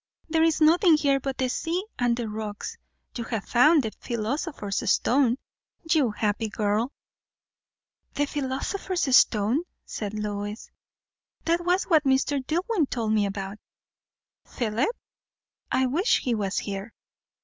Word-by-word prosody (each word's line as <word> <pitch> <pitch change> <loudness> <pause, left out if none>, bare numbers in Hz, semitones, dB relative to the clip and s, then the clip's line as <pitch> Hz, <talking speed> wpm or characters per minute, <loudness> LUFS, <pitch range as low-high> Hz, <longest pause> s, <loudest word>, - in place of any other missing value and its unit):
"There 320 0 +2
is 325 -1 +3
nothing 330 +2 +6
here 280 -2 +2
but 270 0 -4
the 260 - +1
sea 340 +8 -2
and 240 -1 +2
the 235 -2 -3
rocks. 215 - -5 0.4
You 235 - -3
have 225 -3 -3
found 295 +5 +5
the 220 - -3
philosopher's 235 - -2
stone, 255 -1 +3 0.5
you 295 -7 +4
happy 215 +1 -1
girl!" 210 +4 0 1.2
"The 290 - +2
philosopher's 285 +3 -1
stone?" 220 +7 +4 0.2
said 210 -1 -5
Lois. 205 0 -4 0.7
"That 335 +1 +1
was 360 +2 +2
what 315 -4 +3
Mr. 270 0 +1
Dillwyn 350 - 0
told 225 -3 -1
me 210 -2 +2
about." 195 +1 -5 0.8
"Philip? 230 - -1 0.8
I 260 - +2
wish 330 - +2
he 245 - 0
was 200 -3 -2
here." 200 +2 -4
255 Hz, 130 wpm, -26 LUFS, 215-310 Hz, 1.2 s, nothing